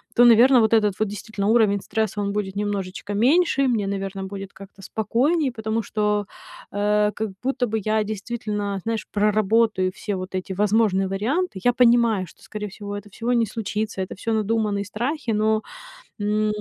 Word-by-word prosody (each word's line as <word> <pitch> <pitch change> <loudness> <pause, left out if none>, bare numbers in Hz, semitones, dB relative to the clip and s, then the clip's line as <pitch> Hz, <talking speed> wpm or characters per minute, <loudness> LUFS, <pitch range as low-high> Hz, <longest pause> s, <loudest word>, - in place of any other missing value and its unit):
то, 245 - +7
наверно, 240 +3 +7
вот 220 0 +3
этот 210 -3 +3
вот 215 - +1
действительно 205 0 -4
уровень 215 -3 +4
стресса, 220 -2 -2
он 200 0 -1
будет 200 -2 -3
немножечко 205 -1 -3
меньше. 275 - +3
И - - +3
мне, 220 -5 0
наверно, 195 -1 -4
будет 195 0 -7
как-то 195 0 -14
спокойнее, 260 - 0
потому 220 0 -2
что, 210 -1 0 0.5
э, 210 +1 +2
как 220 0 -2
будто 255 -1 0
бы 220 0 -1
я 215 +1 +1
действительно, 210 -2 -4
знаешь, 225 -1 -3
проработаю 210 -2 +2
все 205 +1 -4
вот 185 +1 -6
эти 185 +1 -4
возможные 200 -1 +2
варианты. 215 - -1
Я 245 - +5
понимаю, 235 -5 +3
что, - - -19
скорее 210 -1 -6
всего, 205 +1 -7
это 205 +1 -10
всего 230 +5 -3
не 235 -2 +3
случится, 215 -1 -3
это 185 - -5
всё 225 +4 -2
надуманные 215 -1 0
страхи, 240 +7 -3
но, 215 0 +2 0.6
м, 210 +1 +1
210 Hz, 175 wpm, -23 LUFS, 200-230 Hz, 0.6 s, то